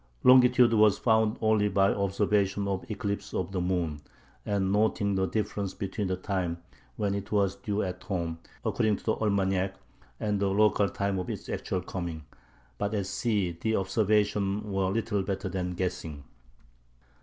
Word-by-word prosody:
Longitude 125 -2 +6
was 105 -2 +5
found 110 -2 +2
only 110 -2 +3
by 100 -1 +3
observations 100 0 +1
of 95 +1 -3
eclipses 100 -1 -3
of 90 0 -2
the 95 -2 -1
moon, 85 -5 -1 0.5
and 100 -2 +1
noting 105 -1 +2
the 95 0 +1
difference 100 -2 -2
between 100 +1 -3
the 95 - 0
time 90 -3 -2 0.4
when 100 +5 -1
it 100 -1 -5
was 100 -2 +2
due 105 +1 -2
at 90 -1 -4
home, 85 -4 -3 0.3
according 110 -3 +2
to - - -15
the 110 - +1
almanac, 95 -3 0 0.4
and 105 -1 0
the 100 -1 +1
local 100 0 +3
time 100 0 -1
of 90 - -4
its - - -5
actual 90 - -2
coming; 85 -4 -5 0.5
but 105 +1 -1
at 100 -2 -1
sea 95 -3 -1
the 110 0 +1
"observations" 105 0 +1
were 95 -2 0
little 105 0 0
better 95 0 -3
than 90 -1 -3
guessing. 80 -5 -4
100 Hz, 160 wpm, -28 LUFS, 95-105 Hz, 0.5 s, Longitude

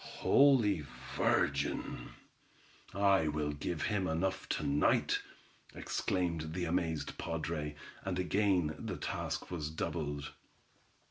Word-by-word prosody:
"Holy 115 - +4 0.3
Virgin! - - +1 0.8
I 100 -4 +3
will 75 0 0
give 75 +2 -3
him 100 -4 +1
enough 95 +4 -1
to - - -1
night," 70 +1 +3 0.6
exclaimed 85 -4 -1
the 90 -1 -1
amazed 80 -2 -1
padre, 80 -2 -3 0.3
and 95 -2 -2
again 90 -3 +2
the - - -4
task - - -3
was 75 -4 -2
doubled. 75 -2 -3
85 Hz, 105 wpm, -34 LUFS, 75-95 Hz, 0.8 s, Holy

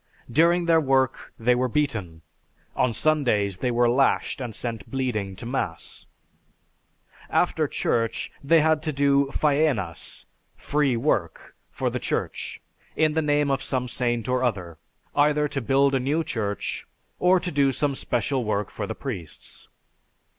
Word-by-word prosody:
During 170 +6 +4
their 165 -1 +4
work 130 -2 +1
they 120 +2 +3
were 125 +1 +1
beaten. 110 - -2 0.5
On 125 - +2
Sundays 110 -9 +1
they 125 - 0
were 120 0 +3
lashed 135 +2 +1
and 120 -4 -5
sent 115 -2 -5
bleeding 115 -8 -2
to 105 - -8
Mass. 115 -10 -4 1.2
After - - +1
Church 115 -1 -1
they 160 +3 +5
had 160 0 +2
to 155 0 -2
do 140 -1 +2
Faenas 140 - 0 0.3
(free 145 -4 0
work) 110 - -1
for - - -2
the - - -2
Church, - - -3 0.4
in 155 -1 +2
the 160 - +1
name 145 -1 +2
of 135 0 0
some 130 -2 -1
saint 120 -1 -1
or 125 0 +1
other 90 -9 -2 0.4
either 150 +1 +3
to 135 - -3
build 135 +3 +3
a 135 - +2
new 145 +6 0
church 105 -8 -3 0.3
or 180 +1 +4
do 145 -6 +1
some 145 +1 0
special 130 0 -1
work 105 -1 -1
for 100 - -4
the 110 - -4
priests. 95 - -8
130 Hz, 145 wpm, -25 LUFS, 115-145 Hz, 1.2 s, they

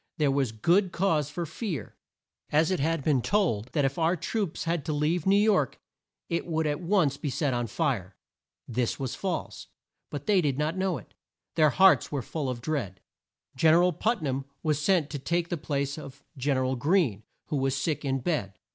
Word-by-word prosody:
There 150 -3 +2
was 135 -4 +1
good 175 - +2
cause 160 -6 +1
for 170 +3 -4
fear, 165 - -5 0.5
as 155 +4 +3
it 185 - 0
had 160 +1 0
been 140 -4 +2
told 125 - +1
that 145 -3 +2
if 135 +4 -1
our 165 +2 +3
troops 185 +1 -2
had 165 -2 -1
to 155 - -1
leave 155 +4 0
New 195 - +5
York 200 - +2 0.5
it 170 0 -2
would 160 -1 0
at 145 -1 0
once 175 -6 +2
be 145 - -3
set 135 +1 0
on 120 -1 -1
fire. 110 - -1 0.5
This 120 0 -1
was 130 -3 -3
false, 185 -4 -4 0.4
but 145 -1 -6
they 200 -3 +4
did 140 -5 0
not 155 +3 0
know 185 -3 0
it. 115 - -14 0.4
Their 155 -1 +4
hearts 190 +5 +5
were 140 -4 -2
full 145 -1 -3
of 120 -2 -4
dread. 120 - -3 0.6
Gen 160 +4 +5
er 175 - +5
al 180 0 +3
Put 220 +4 0
nam 135 -1 -2 0.2
was 150 -2 +1
sent 165 -3 +2
to 145 - -4
take 170 +4 -1
the 175 - 0
place 140 -1 -2
of 140 -1 -11
Gen 135 0 0
er 130 - +1
al 130 +1 0
Greene 140 - +2 0.3
who 150 - 0
was 135 0 0
sick 150 +3 -1
in 135 -2 -1
bed. 120 - -1
150 Hz, 205 wpm, -28 LUFS, 135-170 Hz, 0.6 s, New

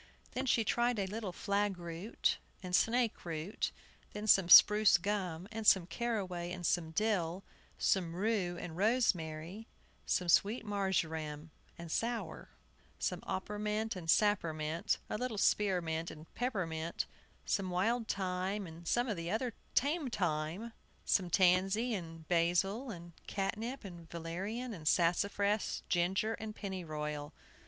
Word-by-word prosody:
Then 260 +1 -3
she 235 -2 +3
tried 240 +2 +1
a 200 - 0
little 205 0 -4
flagroot 195 0 -1 0.2
and 180 -1 -6
snakeroot, 205 -8 0 0.4
then 210 +1 -5
some 195 -4 +5
spruce 210 0 +9
gum, 185 -2 -2
and 220 -1 -3
some 185 -3 +7
caraway 185 -3 -3
and 180 -1 -5
some 165 -2 +1
dill, 185 -1 0 0.3
some 175 -4 +1
rue 190 -3 0
and 160 -2 -6
rosemary, 190 -3 0 0.4
some 180 - +1
sweet 205 +7 +3
marjoram 160 -6 -2 0.3
and 170 -1 -8
sour, 230 +4 -2 0.5
some - - -1
oppermint 210 +3 -2
and 175 -3 -7
sappermint, 165 -6 +2
a 210 - -3
little 250 -4 -2
spearmint 175 -6 +1
and 155 +1 -12
peppermint, 170 -9 -2 0.4
some 195 -2 0
wild 220 +6 +1
thyme, 190 +1 -2
and 165 0 -10
some 240 +6 +2
of 215 - -1
the 170 -1 -4
other 230 +4 -1 0.2
tame 290 +1 +1
time, 175 +3 -2 0.3
some 185 -3 +2
tansy 190 +6 +3
and 165 -4 -6
basil, 180 +8 +1
and 170 -4 -8 0.2
catnip 215 +6 -3
and 170 -3 -10
valerian, 195 +9 -4
and 160 -6 -7
sassafras, 200 +5 +1
ginger, 190 +5 +1
and 220 -1 -6
pennyroyal. 155 -7 -4
190 Hz, 130 wpm, -34 LUFS, 170-215 Hz, 0.5 s, spruce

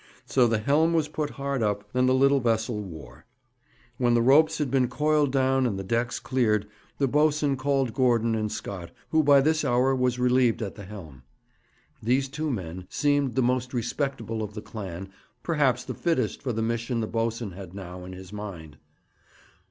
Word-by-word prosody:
So 125 -3 +3
the 115 -1 +1
helm 150 +9 +2
was 160 -2 +2
put 150 -1 -3
hard 140 -2 -3
up, 105 -1 -1
and 125 0 +3
the 130 - +4
little 140 +1 +4
vessel 110 -2 0
wore. 85 -6 -11 0.7
When 120 -2 +3
the 120 - +4
ropes 155 +5 +5
had 145 -4 -1
been 130 -2 +3
coiled 150 +2 +1
down 130 -1 +2
and 100 -5 -2
the 95 - -4
decks 120 +5 -1
cleared, 110 -6 +1 0.3
the 140 - +2
boatswain 150 0 +2
called 135 -2 0
Gordon 115 -3 +2
and 110 -1 -1
Scott, 90 -4 -6 0.2
who 160 - +4
by 140 -2 +6
this 155 +2 +2
hour 125 +2 +2
was 125 -1 +1
relieved 125 -2 +2
at 100 - -5
the 100 - -10
helm. 85 -10 -10 0.8
These 130 +4 +1
two 150 +3 -3
men 90 - -5
seemed 145 -3 +1
the 130 - +2
most 125 +1 0
respectable 120 -2 -2
of 105 -1 -5
the 105 - -5
clan, 95 -3 -7 0.3
perhaps 140 -7 +1
the - - -5
fittest 170 -2 -1
for 130 - -2
the 110 -1 -2
mission 115 +1 -1
the 110 - 0
boatswain 115 -1 -2
had 95 0 -10
now 90 -2 -8
in 90 +1 -8
his 95 +1 -11
mind. 85 -8 -8
125 Hz, 185 wpm, -26 LUFS, 105-135 Hz, 0.8 s, by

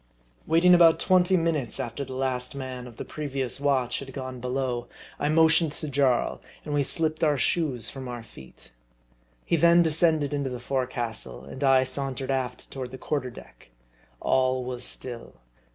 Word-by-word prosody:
Waiting 170 +3 +5
about 170 -2 +6
twenty 185 0 +4
minutes 160 -8 -1
after 120 +4 -4
the 130 -1 -7
last 130 -1 -2
man 130 -2 -6
of 120 - -13
the - - -6
previous 135 -4 -3
watch 130 -4 +1
had 135 -1 -9
gone 130 -1 -6
below, 125 -1 -2 0.3
I 145 - 0
motioned 160 0 +4
to 155 - -6
Jaii, 135 -3 +1 0.3
and 150 - -4
we 145 - +2
slipped 155 +3 0
our 150 -2 +3
shoes 135 -5 +1
from 130 -2 -7
our 120 -2 -6
feet. 65 - -14 0.7
He 170 - +2
then 170 +2 +6
descended 160 -2 +2
into 140 -2 -1
the 125 -1 -5
forecastle, 120 - -3
and 100 - -7
I 135 -1 +5
sauntered 135 0 -3
aft 130 -2 -3
toward 130 -2 -5
the 130 - -9
quarter 140 -1 -2
deck. 115 - -15 0.5
All 130 -1 +1
was 125 -1 -5
still. 120 -2 -5
135 Hz, 170 wpm, -26 LUFS, 125-155 Hz, 0.7 s, about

